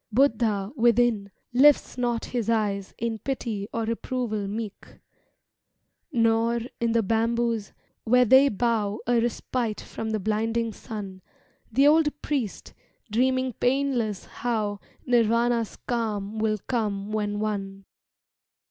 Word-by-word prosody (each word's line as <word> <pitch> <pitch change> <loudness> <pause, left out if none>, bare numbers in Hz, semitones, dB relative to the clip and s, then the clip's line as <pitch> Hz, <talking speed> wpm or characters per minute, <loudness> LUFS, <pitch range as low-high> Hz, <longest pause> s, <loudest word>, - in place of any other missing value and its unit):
Buddha 220 -5 +2
within 235 -4 +3 0.2
lifts 285 +3 +5
not 240 -2 -1
his 235 -3 -2
eyes 205 -4 0
In 230 -1 -2
pity 225 -7 -3
or 230 - -2
reproval 230 -2 -2
meek; 210 0 -6 1.1
Nor, 230 0 +2 0.2
in 235 -1 +1
the 230 -1 +3
bamboos, 230 0 0 0.3
where 250 +2 +4
they 265 +4 +6
bow 215 -2 0
A 240 0 +3
respite 235 -1 -2
from 225 - -6
the 220 -1 -1
blinding 225 +2 -1
sun, 200 -5 -7 0.5
The 270 +5 +4
old 300 0 +4
priest 260 -9 -3 0.4
dreaming 255 +2 +1
painless 245 -5 0
how 215 -4 -2 0.3
Nirvana's 235 -1 +2
calm 220 -3 -2
will 215 -1 +1
come 210 -4 -2
when 205 -1 -1
won. 195 -2 -3
230 Hz, 115 wpm, -26 LUFS, 210-245 Hz, 1.1 s, they